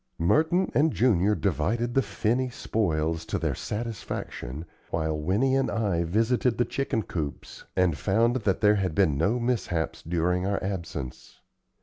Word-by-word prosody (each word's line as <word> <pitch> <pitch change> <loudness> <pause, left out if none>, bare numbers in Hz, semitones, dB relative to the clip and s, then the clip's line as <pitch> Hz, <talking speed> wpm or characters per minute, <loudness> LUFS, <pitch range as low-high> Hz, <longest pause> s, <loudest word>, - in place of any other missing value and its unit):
Merton 160 - +2
and 155 +2 +3
Junior 105 -6 +3
divided 105 - 0
the 135 - +4
finny 125 +2 0
spoils 80 -9 -1
to - - -1
their - - -1
satisfaction, 95 - -5 0.2
while 80 -1 -1
Winnie 100 - +1
and 135 -1 +1
I 100 -7 0
visited 115 +6 +1
the 120 - +2
chicken 125 -5 -1
coops 75 -7 -6
and 90 -4 +3
found 115 - +2
that 105 -6 0
there 105 -1 +5
had 95 -5 -1
been 80 -7 +3
no 100 - +1
mishaps 115 -9 -1
during 90 +2 0
our 100 0 0
absence. 85 -9 -5
100 Hz, 145 wpm, -27 LUFS, 85-120 Hz, 0.2 s, there